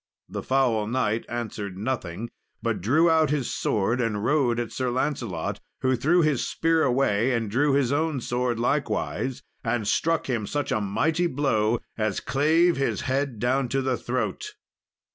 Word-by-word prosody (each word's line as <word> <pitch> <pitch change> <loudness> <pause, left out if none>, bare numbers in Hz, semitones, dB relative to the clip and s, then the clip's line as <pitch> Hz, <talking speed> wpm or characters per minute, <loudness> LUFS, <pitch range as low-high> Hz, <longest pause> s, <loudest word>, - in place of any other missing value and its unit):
The - - -5
foul 125 -5 +1
knight 115 -2 0
answered 105 -5 -4
nothing, 110 -2 -3 0.3
but - - -1
drew 145 - +4
out 160 -2 +4
his 145 -4 -1
sword 110 +5 0
and 105 -2 -1
rode 125 -4 +2
at 120 -2 -3
Sir 130 -1 -1
Lancelot, 120 - -2 0.2
who 130 0 +2
threw 170 +7 +3
his 150 -5 +1
spear 165 0 +1
away 125 -4 +2
and 115 -3 -1
drew 140 +5 +2
his 135 -2 +2
own 155 -1 0
sword 120 -1 -1
likewise, 130 0 -1 0.2
and 115 -2 -1
struck 165 +8 +1
him 115 -6 -1
such 145 -1 -2
a 110 - +1
mighty 160 - +1
blow 120 -7 +1 0.2
as 110 -2 0
clave 160 +5 +3
his 135 - 0
head 135 -2 -1
down 125 +3 0
to 135 +1 0
the 130 -1 +1
throat. 130 - -3
130 Hz, 160 wpm, -25 LUFS, 115-145 Hz, 0.3 s, drew